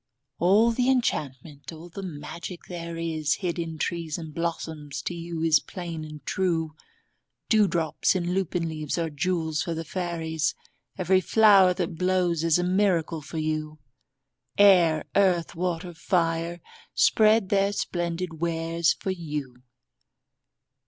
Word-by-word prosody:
All 205 +7 +4
the 250 +2 +1
enchantment, 145 - -2
all 165 +1 -10
the 175 +3 -8
magic 170 +1 -7
there 170 -1 -6
is 160 -2 -1
Hid 180 -2 -3
in 165 -1 -4
trees 165 -1 -2
and 160 -3 -8
blossoms, 160 -3 -4
to - - -3
you 170 -1 -5
is 160 -2 +5
plain 170 -3 -7
and 150 -2 -10
true. 165 -4 -1 0.8
Dewdrops 190 -7 +2
in 175 -1 -1
lupin 180 -2 -1
leaves 155 -1 -3
are 165 -2 -1
jewels 160 0 -1
for 165 +2 -3
the 165 +1 -5
fairies; 160 -4 -2 0.4
Every 185 0 +3
flower 195 -3 +5
that 170 -2 -3
blows 180 -3 +1
is 165 -1 +4
a 175 - 0
miracle 180 -4 +1
for 160 - -8
you. 155 0 -2 0.8
Air, 175 -6 +5
earth, 185 -4 +2
water, 175 0 -3
fire, 170 0 -1 0.3
spread 215 -2 +4
their 200 0 +2
splendid 175 -3 -3
wares 165 0 +1
for 195 - -4
you. 150 -8 -5
170 Hz, 135 wpm, -26 LUFS, 160-185 Hz, 0.8 s, is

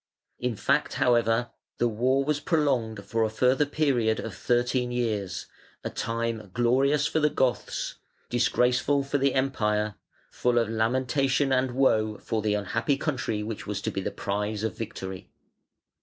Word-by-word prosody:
In 125 -2 -1
fact, 140 +8 +1
however, 120 -1 +2 0.3
the 120 - +2
war 125 +5 +1
was 150 0 +1
prolonged 135 - 0
for 115 -1 -1
a 110 - +1
further 130 +6 +2
period 130 -7 +1
of 115 - -5
thirteen 125 +3 +1
years, 105 -6 -2 0.4
a - - -3
time 115 -2 -3
glorious 135 +5 +3
for 160 - +1
the 150 0 +3
Goths, 130 -4 -1 0.3
disgraceful 125 +3 +2
for 140 +1 -1
the 135 0 +2
Empire, 105 -6 +1 0.4
full 125 -1 +1
of 115 -2 +2
lamentation 130 +5 +1
and 130 -1 +1
woe 110 -5 +2
for 110 +2 -2
the 105 -1 +1
unhappy 105 +7 0
country 130 -8 -2
which 110 -1 -6
was 105 -1 -2
to - - -1
be 95 - -3
the - - -2
prize 105 +1 -3
of 110 -4 -2
victory. 95 -4 -6
120 Hz, 155 wpm, -27 LUFS, 110-135 Hz, 0.4 s, glorious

